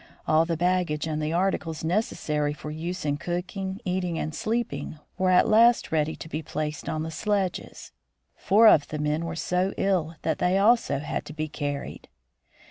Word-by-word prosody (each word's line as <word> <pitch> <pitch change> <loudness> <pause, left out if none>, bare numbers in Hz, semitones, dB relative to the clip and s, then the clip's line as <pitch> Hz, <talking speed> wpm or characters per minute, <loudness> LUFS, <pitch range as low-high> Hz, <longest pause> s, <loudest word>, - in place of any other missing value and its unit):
All 155 +1 +4
the 165 -1 -2
baggage 175 -3 +1
and 155 -1 -2
the 155 +1 -1
articles 170 -3 -1
necessary 155 -5 0
for 150 0 -7
use 170 +3 -5
in 145 -1 0
cooking, 190 +3 -4
eating, 180 -2 -1
and 155 - -3
sleeping, 210 -11 -3 0.2
were 185 0 +1
at 180 - +5
last 230 +2 +5
ready 155 0 +1
to - - -9
be 155 0 -4
placed 150 -1 -4
on 155 0 -2
the 160 - -5
sledges. 195 +2 -2 0.4
Four 220 +4 +5
of 150 -8 +6
the 155 - -5
men 150 +2 -1
were 165 0 -4
so 180 +4 -1
ill 175 -5 0
that 160 - -1
they 180 +2 +2
also 215 - +3
had 145 +2 -3
to 150 - -8
be 155 0 -3
carried. 145 -2 -5
165 Hz, 180 wpm, -26 LUFS, 155-185 Hz, 0.4 s, of